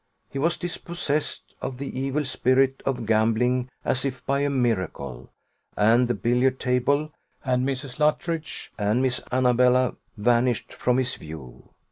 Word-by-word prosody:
He 135 - -4
was 165 +4 +1
dispossessed 170 -3 -3
of 130 -2 -4
the 135 -1 -5
evil 135 +2 -1
spirit 130 +1 +2
of 125 -4 -1
gambling 115 +3 +2 0.2
as 130 - +1
if 130 -2 -4
by 140 0 +1
a 145 0 +1
miracle; 95 - -2 0.5
and 115 +4 +4
the 120 - 0
billiard 125 +5 +1
table, 140 +4 +1 0.3
and 130 0 +1
Mrs. 135 0 -5
Luttridge, 155 +1 -1
and 105 +5 +2
Miss 125 -1 0
Annabella, 125 0 +3 0.2
vanished 120 +2 +1
from 125 0 +1
his 130 -1 +1
view. 75 -6 -10
125 Hz, 140 wpm, -25 LUFS, 120-135 Hz, 0.5 s, and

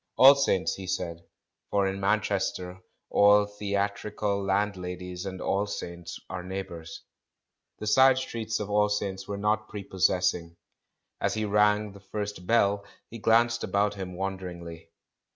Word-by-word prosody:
"All 135 +2 +10
Saints," 135 -9 +1
he 95 -1 -7
said, 90 -3 -3 0.5
for 100 -1 +2
in 95 0 -2
JNIanchester 95 -2 -1 0.3
all 105 0 +6
theat 100 0 -2
rical 100 -1 -2
landladies 90 -2 -2
and 95 -1 -6
All 100 +3 0
Saints 85 -4 -6
are - - -5
neighbours. 90 -3 -7 0.7
The - - -6
side 130 +5 +6
streets 115 -4 -3
of 105 - -3
All 105 0 +2
Saints 100 -2 -2
were 100 0 -4
not 105 +1 0
prepos 95 -3 +1
sessing. 90 -2 -1 0.7
As - - 0
he 110 0 -1
rang 105 0 +3
the 100 - -13
first 100 -1 -6
bell, 100 -3 +3 0.3
he 115 - -7
glanced 115 +2 +3
about 100 +2 +1
him 95 -2 -6
wonderingly. 90 -3 -6
100 Hz, 145 wpm, -28 LUFS, 95-105 Hz, 0.7 s, All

